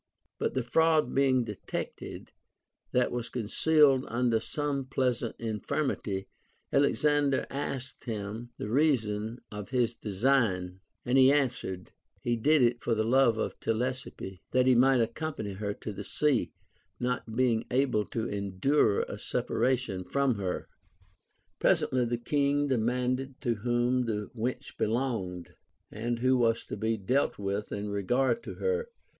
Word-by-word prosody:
But -, -, -1 dB
the 130 Hz, -, +1 dB
fraud 155 Hz, +1 st, +3 dB
being 130 Hz, -2 st, +3 dB
detected, 105 Hz, -4 st, -6 dB, 0.6 s
that 125 Hz, 0 st, +2 dB
was 120 Hz, -1 st, -3 dB
concealed 135 Hz, +4 st, +3 dB
under 120 Hz, -1 st, +1 dB
some 145 Hz, +4 st, -2 dB
little 135 Hz, -, -3 dB
present 125 Hz, -3 st, -1 dB
in 110 Hz, -2 st, -3 dB
firmity, 100 Hz, -10 st, -2 dB, 0.5 s
Alexander 145 Hz, 0 st, +3 dB
asked 135 Hz, -2 st, -5 dB
him 110 Hz, +1 st, -5 dB
the -, -, -4 dB
reason 115 Hz, -4 st, +1 dB
of 105 Hz, 0 st, -7 dB
his 120 Hz, -2 st, +1 dB
design; 100 Hz, -5 st, 0 dB, 0.3 s
and 125 Hz, +2 st, +3 dB
he 130 Hz, +1 st, +7 dB
answered, 125 Hz, -10 st, -1 dB, 0.3 s
he 120 Hz, -, 0 dB
did 145 Hz, +5 st, +4 dB
it 120 Hz, 0 st, +2 dB
for 115 Hz, -, +1 dB
the 110 Hz, -, +1 dB
love 120 Hz, 0 st, +4 dB
of -, -, -3 dB
Telesippe, 115 Hz, -5 st, -3 dB
that 130 Hz, 0 st, +3 dB
he 130 Hz, -, +6 dB
might 130 Hz, +1 st, +5 dB
accompany 115 Hz, -3 st, -3 dB
her 100 Hz, +1 st, -3 dB
to 105 Hz, -, -6 dB
the -, -, -6 dB
sea, 130 Hz, -, +1 dB, 0.5 s
not 125 Hz, -2 st, -2 dB
being 120 Hz, -3 st, +2 dB
able 125 Hz, -4 st, +2 dB
to 115 Hz, 0 st, -3 dB
endure 100 Hz, +4 st, +1 dB
a -, -, -7 dB
separation 125 Hz, -8 st, -1 dB
from 140 Hz, +4 st, +1 dB
her. 95 Hz, -2 st, -3 dB, 0.9 s
Presently 125 Hz, -1 st, +2 dB
the 120 Hz, 0 st, -1 dB
King 145 Hz, +3 st, +1 dB
demanded 125 Hz, +2 st, 0 dB
to 120 Hz, -, +1 dB
whom 120 Hz, +2 st, +1 dB
the 105 Hz, -2 st, -3 dB
wench 125 Hz, +4 st, -3 dB
belonged, 110 Hz, -7 st, -2 dB, 0.4 s
and 115 Hz, +3 st, -2 dB
who 130 Hz, +2 st, +3 dB
was 115 Hz, -2 st, +2 dB
to -, -, -6 dB
be 110 Hz, +2 st, 0 dB
dealt 125 Hz, +8 st, +1 dB
Λvith 100 Hz, +1 st, -3 dB
in 105 Hz, 0 st, -3 dB
regard 125 Hz, -, +1 dB
to -, -, -7 dB
her. 470 Hz, 0 st, -1 dB
120 Hz, 145 wpm, -29 LUFS, 110-135 Hz, 0.9 s, he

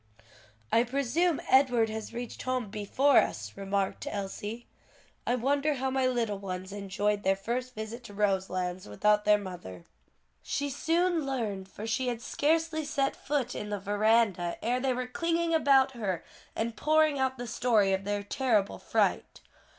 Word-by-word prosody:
"I 230 Hz, -, +5 dB
presume 280 Hz, +6 st, +1 dB
Edward 250 Hz, -4 st, +4 dB
has 220 Hz, 0 st, -5 dB
reached 240 Hz, 0 st, -6 dB
home 255 Hz, -5 st, -2 dB
before 245 Hz, +7 st, +2 dB
us," 105 Hz, -1 st, -2 dB
remarked 195 Hz, 0 st, -2 dB
Elsie, 205 Hz, +3 st, -5 dB, 0.6 s
"I 245 Hz, -, +3 dB
wonder 285 Hz, +4 st, +1 dB
how 265 Hz, 0 st, -1 dB
my 260 Hz, -1 st, +2 dB
little 230 Hz, -5 st, -1 dB
ones 185 Hz, 0 st, -5 dB
enjoyed 205 Hz, +1 st, -1 dB
their 195 Hz, -1 st, +2 dB
first 250 Hz, +5 st, -4 dB
visit 220 Hz, +3 st, -6 dB
to 205 Hz, -, -10 dB
Roselands 185 Hz, -3 st, -1 dB
without 210 Hz, -, +2 dB
their 210 Hz, 0 st, +6 dB
mother." 175 Hz, -, -8 dB, 0.6 s
She 285 Hz, 0 st, -2 dB
soon 335 Hz, +3 st, +1 dB
learned; 215 Hz, -8 st, -3 dB
for 210 Hz, -, -8 dB
she 250 Hz, +3 st, -1 dB
had 240 Hz, -2 st, -1 dB
scarcely 320 Hz, +1 st, +1 dB
set 285 Hz, -2 st, 0 dB
foot 280 Hz, -3 st, -2 dB
in 210 Hz, -, -5 dB
the 205 Hz, -1 st, -2 dB
veranda 205 Hz, -3 st, +2 dB
ere 245 Hz, +3 st, +1 dB
they 260 Hz, -1 st, 0 dB
were 255 Hz, 0 st, -2 dB
clinging 335 Hz, +5 st, 0 dB
about 275 Hz, -4 st, +5 dB
her 205 Hz, -8 st, -3 dB, 0.3 s
and 225 Hz, +1 st, -2 dB
pouring 310 Hz, +1 st, +3 dB
out 260 Hz, 0 st, 0 dB
the 245 Hz, -, -5 dB
story 225 Hz, -4 st, +2 dB
of 190 Hz, 0 st, -1 dB
their 205 Hz, 0 st, -2 dB
terrible 215 Hz, -2 st, 0 dB
fright. -, -, 0 dB
230 Hz, 160 wpm, -29 LUFS, 200-265 Hz, 0.6 s, their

